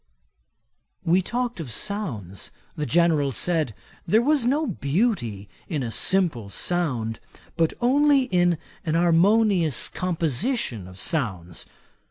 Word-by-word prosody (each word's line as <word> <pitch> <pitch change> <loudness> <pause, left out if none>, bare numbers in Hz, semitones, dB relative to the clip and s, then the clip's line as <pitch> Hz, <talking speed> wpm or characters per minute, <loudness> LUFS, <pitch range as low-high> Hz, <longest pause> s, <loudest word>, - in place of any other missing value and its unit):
We 175 +3 +4
talked 240 +2 -3
of 145 -7 -5
sounds. 115 - -3 0.3
The 150 -1 -3
General 160 -4 +3
said, 155 -1 0 0.3
there 220 - +4
was 285 -3 +2
no 295 +5 +2
beauty 140 - -1 0.2
in 150 -5 -2
a 115 - -4
simple 160 - +1
sound, 120 - -1 0.4
but 165 -1 +1
only 280 +2 +4
in 175 -7 +2 0.3
an 160 -1 -1
harmonious 175 - +3
composition 165 - -1
of 90 0 -12
sounds. 95 - -3
165 Hz, 115 wpm, -24 LUFS, -, 0.4 s, We